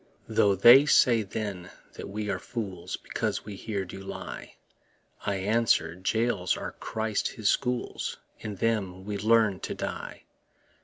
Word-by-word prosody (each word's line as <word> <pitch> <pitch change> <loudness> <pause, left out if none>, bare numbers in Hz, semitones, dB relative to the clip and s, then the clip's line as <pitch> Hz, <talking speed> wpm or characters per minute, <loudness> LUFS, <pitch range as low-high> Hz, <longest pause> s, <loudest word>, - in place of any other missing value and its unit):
Though 100 -1 +3
they 120 +9 +8
say 120 -5 +5
then 100 -3 -5 0.2
that - - -8
we 105 +1 -4
are 95 - -2
fools 95 -4 -5
Because - - -3
we 105 -1 -7
here 100 -1 -3
do 95 +2 -9
lie, 95 - -8 0.7
I 100 - +1
answer, 100 -4 +2
Jails 95 0 0
are - - -5
Christ 110 -1 -2
his 110 -5 0
schools, 125 -2 -1 0.2
In 105 -2 -5
them 95 -3 -1
we 105 -1 -3
learn 110 -3 +3
to - - -4
die. - - -5
105 Hz, 145 wpm, -28 LUFS, 95-115 Hz, 0.7 s, they